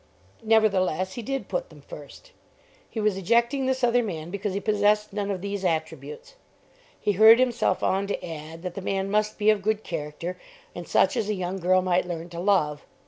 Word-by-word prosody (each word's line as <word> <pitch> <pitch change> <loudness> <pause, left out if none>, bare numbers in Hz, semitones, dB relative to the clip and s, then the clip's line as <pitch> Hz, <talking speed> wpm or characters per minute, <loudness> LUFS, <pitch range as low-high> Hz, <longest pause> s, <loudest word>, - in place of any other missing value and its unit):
Nevertheless 195 -5 +2
he 240 - -5
did 270 +4 -4
put - - -3
them - - -15
first. - - -12 0.6
He 225 - -5
was 210 -3 +1
ejecting 235 +7 +1
this 260 -1 -1
other 245 0 +4
man 170 -7 -5
because 200 0 -3
he - - 0
possessed 210 0 +1
none 205 -1 -2
of 190 -3 -3
these 200 0 -4
attributes. 155 - -3 0.7
He 210 - +1
hurried 220 +3 +8
himself 240 -6 +1
on 195 +1 +1
to 205 - -4
add 165 0 -8
that 180 -2 -4
the 195 - -6
man 195 0 -2
must 210 0 0
be 215 +1 +4
of 210 -2 0
good 215 +1 -1
character, 165 +2 -5 0.3
and 175 -1 -8
such - - +3
as 210 - -1
a 210 - 0
young 185 0 -3
girl 185 +1 +3
might 180 0 +1
learn 170 -1 -5
to 170 -1 -7
love. 170 -6 +1
200 Hz, 195 wpm, -25 LUFS, 180-215 Hz, 0.7 s, hurried